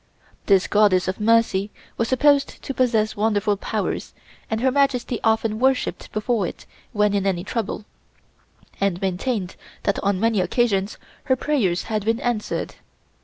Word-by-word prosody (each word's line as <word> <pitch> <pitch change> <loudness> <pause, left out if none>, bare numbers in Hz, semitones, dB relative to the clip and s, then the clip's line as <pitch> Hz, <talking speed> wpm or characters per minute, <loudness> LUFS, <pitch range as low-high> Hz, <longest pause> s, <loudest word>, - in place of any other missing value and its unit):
This 195 -2 +4
Goddess 205 -3 +3
of 185 +2 -2
Mercy 215 -2 +2 0.3
was 230 - -1
supposed 280 +2 +2
to 275 - -4
possess 230 -5 +1
wonderful 210 -1 +1
powers 200 - -3 0.3
and 220 - -1
Her 260 +2 +2
Majesty 255 -3 +1
often 220 -1 +1
worshiped 265 +1 0
before 215 -2 0
it - - -9 0.3
when 210 -1 +2
in 200 -1 +1
any 175 -3 0
trouble, 215 -1 -3 0.9
and 195 -3 0
maintained 190 +1 -2 0.3
that 200 - 0
on 200 -1 +1
many 225 -2 +2
occasions 200 -1 0 0.3
her 260 - +3
prayers 245 -11 0
had 215 -2 -2
been 225 +2 0
answered. 240 -3 -2
215 Hz, 145 wpm, -22 LUFS, 195-240 Hz, 0.9 s, This